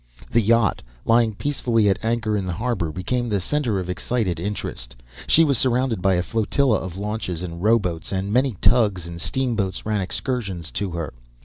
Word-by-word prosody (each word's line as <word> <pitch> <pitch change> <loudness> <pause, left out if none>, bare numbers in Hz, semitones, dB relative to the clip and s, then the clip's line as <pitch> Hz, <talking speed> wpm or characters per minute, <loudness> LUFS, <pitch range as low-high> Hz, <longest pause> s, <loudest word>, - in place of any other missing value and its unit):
The 115 - +4
yacht, 115 -1 +3 0.2
lying 115 -2 +3
peacefully 120 -5 +1
at 95 - +1
anchor 115 -2 0
in 100 -2 -1
the 90 - -2
harbour, 100 -5 -1
became 120 +9 -2
the 100 -2 +1
centre 120 -1 0
of 90 - -4
excited 90 -2 -1
interest. 85 -10 -5 0.3
She 165 - +6
was 140 -6 +2
surrounded 125 -5 +1
by 95 0 +3
a 90 - +1
flotilla 115 +2 +1
of 95 -1 -6
launches 100 -4 -3
and 85 -1 -6
rowboats, 95 -6 +1
and 95 +1 -2
many 125 -3 +2
tugs 105 -8 +3
and 85 0 -7
steamboats 115 -7 -1
ran 105 -2 0
excursions 95 - -3
to 100 -1 -2
her. 85 -3 -4
105 Hz, 180 wpm, -23 LUFS, 90-120 Hz, 0.3 s, She